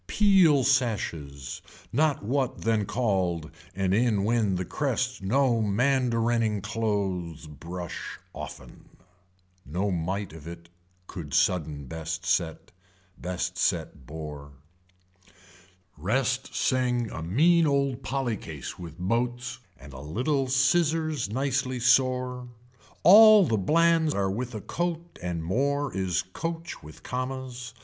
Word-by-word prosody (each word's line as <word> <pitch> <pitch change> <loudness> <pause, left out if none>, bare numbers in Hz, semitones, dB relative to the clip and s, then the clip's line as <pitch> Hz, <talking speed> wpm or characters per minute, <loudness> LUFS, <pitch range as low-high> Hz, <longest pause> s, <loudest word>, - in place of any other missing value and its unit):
Peel 185 -9 +5
sashes 90 - -1 0.3
not 145 0 +2
what 130 +3 -1
then 110 -3 +1
called 95 -9 -1 0.2
and 95 -1 0
in 110 -2 +2
when 110 -3 +1
the 90 0 -2
crest 125 - -2
no 120 +3 +2
mandarining 115 -1 +1
clothes 95 -6 -2
brush 85 +3 -7 0.2
often. - - -10 0.7
No 95 +7 -2
might 90 +1 -2
of 80 -1 -11
it 85 0 -10 0.4
could 80 -7 -6
sudden 75 -5 +1
best 80 +3 -5
set. 85 -3 -1 0.5
Best 90 0 -3
set 65 - -1
boar. 75 -2 -8 1.4
Rest 125 - -1
sing 125 -3 +1
a 85 - -6
mean 160 - +4
old 140 -2 +1
polly 130 -6 -2
case 75 -6 -8
with 85 -2 -9
boats 120 +7 -2 0.2
and 70 - -12
a 65 - -8
little 130 - -1
scissors 155 +1 +2
nicely 130 +1 -1
sore. 125 0 +2 0.6
All 215 +2 +9
the 115 - +1
blands 160 - +3
are 95 -1 0
with 120 +3 -4
a 105 - -5
coat 170 - -4
and 85 -2 -3
more 140 - 0
is 90 -3 0
coach 165 - -5
with 75 -1 -13
commas. 125 -1 -5
115 Hz, 120 wpm, -27 LUFS, 90-135 Hz, 1.4 s, All